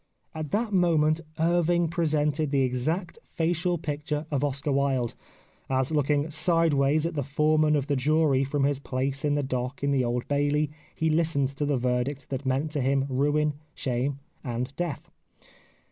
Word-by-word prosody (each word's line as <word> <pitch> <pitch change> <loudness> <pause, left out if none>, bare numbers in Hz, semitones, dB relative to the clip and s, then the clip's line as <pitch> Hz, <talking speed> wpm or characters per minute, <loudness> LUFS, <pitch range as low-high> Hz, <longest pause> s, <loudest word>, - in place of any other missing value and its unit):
At 155 -2 -5
that 215 +3 -1
moment 165 -3 +3 0.2
Irving 170 +1 +2
presented 155 -3 0
the 140 -1 +2
exact 155 +8 -2
facial 175 +2 -1
picture 150 0 -3
of 145 -1 0
Oscar 140 +1 -1
Wilde, 135 -3 +1 0.6
as 130 +1 +1
looking 150 0 +1
sideways 155 -3 +2
at 170 - -1
the 145 - -1
foreman 150 +2 +2
of 140 -2 0
the 145 -1 0
jury 145 0 +2
from 140 +1 -1
his 140 -1 +1
place 135 0 -2
in 145 -1 +2
the 145 - 0
dock 130 +1 -3
in 140 - +2
the 135 -2 +2
Old 120 0 -2
Bailey 145 +1 +1 0.2
he 160 0 +1
listened 155 -4 +1
to 140 +1 -3
the 145 -2 +1
verdict 125 +3 -1
that 135 0 -3
meant 135 +4 0
to 150 -3 -1
him 135 +1 +2
ruin, 145 +3 +1 0.2
shame, 130 +2 -1 0.3
and 125 +1 -4
death. 175 -4 -4
145 Hz, 165 wpm, -27 LUFS, 135-155 Hz, 0.6 s, moment